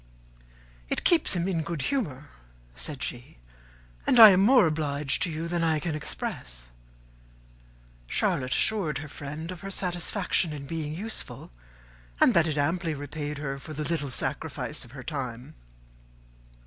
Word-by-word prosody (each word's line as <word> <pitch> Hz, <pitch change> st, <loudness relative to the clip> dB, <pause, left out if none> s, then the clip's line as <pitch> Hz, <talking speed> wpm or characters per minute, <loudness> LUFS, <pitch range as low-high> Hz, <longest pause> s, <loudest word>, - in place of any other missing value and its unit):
"It -, -, -1 dB
keeps 325 Hz, -, +4 dB
him 175 Hz, 0 st, 0 dB
in 175 Hz, -4 st, 0 dB
good 160 Hz, -2 st, -4 dB
humour," 150 Hz, -, -2 dB, 0.5 s
said 145 Hz, -, -5 dB
she, 120 Hz, -, -6 dB, 0.7 s
"and 245 Hz, -, +5 dB
I 220 Hz, -2 st, +13 dB
am 185 Hz, -, +4 dB
more 235 Hz, +3 st, +6 dB
obliged 150 Hz, -2 st, 0 dB
to 180 Hz, -, +1 dB
you 160 Hz, +1 st, -3 dB
than 170 Hz, 0 st, -1 dB
I 160 Hz, -1 st, +2 dB
can 160 Hz, +1 st, -2 dB
express." 60 Hz, -, -5 dB, 1.4 s
Charlotte 130 Hz, -, 0 dB
assured 185 Hz, -10 st, +1 dB
her 150 Hz, +2 st, -6 dB
friend 150 Hz, +4 st, -6 dB
of 180 Hz, -, -8 dB
her 195 Hz, -, -6 dB
satisfaction 180 Hz, -2 st, -1 dB
in 140 Hz, -2 st, -7 dB
being 155 Hz, 0 st, -4 dB
useful, 215 Hz, +6 st, -6 dB, 0.7 s
and 250 Hz, -, +6 dB
that 170 Hz, -3 st, +4 dB
it 155 Hz, -2 st, -1 dB
amply 165 Hz, +2 st, 0 dB
repaid 145 Hz, +1 st, -5 dB
her 140 Hz, -1 st, -4 dB
for 155 Hz, -, -8 dB
the 150 Hz, -, -2 dB
little 150 Hz, -2 st, -1 dB
sacrifice 130 Hz, -, -2 dB
of 120 Hz, -, -13 dB
her 135 Hz, -2 st, -8 dB
time. 125 Hz, -4 st, -5 dB
155 Hz, 150 wpm, -27 LUFS, 140-175 Hz, 1.4 s, I